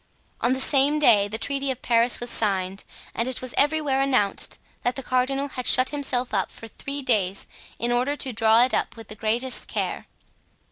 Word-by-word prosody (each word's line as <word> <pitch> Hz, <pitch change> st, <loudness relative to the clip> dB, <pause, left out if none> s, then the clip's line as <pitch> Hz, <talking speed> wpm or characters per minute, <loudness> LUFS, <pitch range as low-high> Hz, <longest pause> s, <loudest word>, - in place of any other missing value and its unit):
On 245 Hz, -, +2 dB
the 260 Hz, -, -2 dB
same 280 Hz, +2 st, +2 dB
day 210 Hz, -9 st, +5 dB
the 215 Hz, +2 st, -3 dB
Treaty 275 Hz, +3 st, -2 dB
of 260 Hz, -, -4 dB
Paris 235 Hz, 0 st, +3 dB
was 240 Hz, 0 st, -4 dB
signed, 195 Hz, -2 st, -1 dB, 0.3 s
and 230 Hz, -, -2 dB
it 260 Hz, -, -3 dB
was 255 Hz, -1 st, -6 dB
everywhere 290 Hz, -2 st, +1 dB
announced 255 Hz, -8 st, +1 dB, 0.2 s
that 245 Hz, -, -1 dB
the 270 Hz, -, -5 dB
cardinal 270 Hz, +3 st, -1 dB
had 250 Hz, -2 st, -3 dB
shut 255 Hz, 0 st, +5 dB
himself 260 Hz, -4 st, -2 dB
up -, -, 0 dB
for 225 Hz, -, -11 dB
three 275 Hz, +5 st, -6 dB
days 200 Hz, -7 st, 0 dB, 0.3 s
in 240 Hz, +1 st, -1 dB
order 250 Hz, +4 st, 0 dB
to 265 Hz, -3 st, -3 dB
draw 225 Hz, +1 st, +5 dB
it 255 Hz, -, 0 dB
up -, -, -1 dB
with 225 Hz, -2 st, -12 dB
the 215 Hz, -, -7 dB
greatest 230 Hz, +5 st, 0 dB
care. -, -, -3 dB
250 Hz, 195 wpm, -24 LUFS, 225-275 Hz, 0.3 s, day